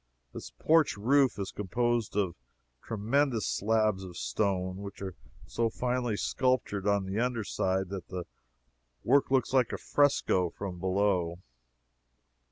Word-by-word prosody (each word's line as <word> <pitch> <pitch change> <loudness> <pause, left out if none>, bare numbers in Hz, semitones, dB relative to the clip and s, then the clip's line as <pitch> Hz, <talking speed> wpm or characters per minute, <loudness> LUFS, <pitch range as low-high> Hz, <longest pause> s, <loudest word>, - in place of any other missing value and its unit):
This - - -7
porch 160 -7 +2
roof 130 +3 +3
is 95 -1 -4
composed 115 +2 -1
of 95 -4 +1 0.5
tremendous 115 +2 0
slabs 110 -2 +1
of 90 -2 -9
stone, 95 -3 -1
which 100 0 -8
are 95 -1 -5 0.3
so 115 -1 0
finely 125 -2 -1
sculptured 115 -7 0
on 100 -1 +2
the 95 +3 -2
under 120 -2 0
side 95 -1 -1
that 95 -2 -6
the 90 -1 -5 0.8
work 140 +3 +3
looks 130 -1 +1
like 130 -3 +3
a - - -3
fresco 135 -11 +2
from 90 0 -6
below. 95 -2 +1
105 Hz, 135 wpm, -30 LUFS, 95-125 Hz, 0.8 s, roof